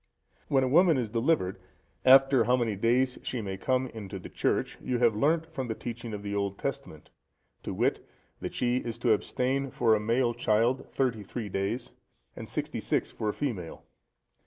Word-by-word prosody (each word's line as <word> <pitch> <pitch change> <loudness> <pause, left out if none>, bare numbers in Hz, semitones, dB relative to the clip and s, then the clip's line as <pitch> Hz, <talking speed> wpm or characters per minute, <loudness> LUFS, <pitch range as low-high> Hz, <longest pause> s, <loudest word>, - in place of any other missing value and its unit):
When 135 -1 +3
a - - +1
woman 165 +3 +5
is 120 -4 -1
delivered, 115 - +1 0.4
after 135 0 +6
how 125 +1 +3
many 115 -4 0
days 125 +5 +1
she 125 - -3
may 95 -3 -4
come 130 +6 0
into 105 -5 -7
the 90 - -9
church, - - -1
you 125 - -1
have 120 -3 +3
learnt 155 +8 +2
from 140 -6 -5
the 110 - -3
teaching 120 -1 -6
of 105 -1 -6
the 100 0 -4
Old 100 -1 -1
Testament, - - -6 0.5
to - - -5
wit, - - 0 0.4
that - - -6
she 125 0 +1
is 115 -3 -4
to 120 -3 +3
abstain 130 +5 -1
for 115 -2 +2
a 110 - +3
male 120 +3 +1
child 115 +2 +1
thirty 125 -5 0
three 105 +2 -6
days, 100 +6 -2 0.4
and - - -8
sixty - - -3
six - - -1
for 105 - -3
a - - -1
female. 105 - -4
120 Hz, 185 wpm, -29 LUFS, 105-130 Hz, 0.5 s, after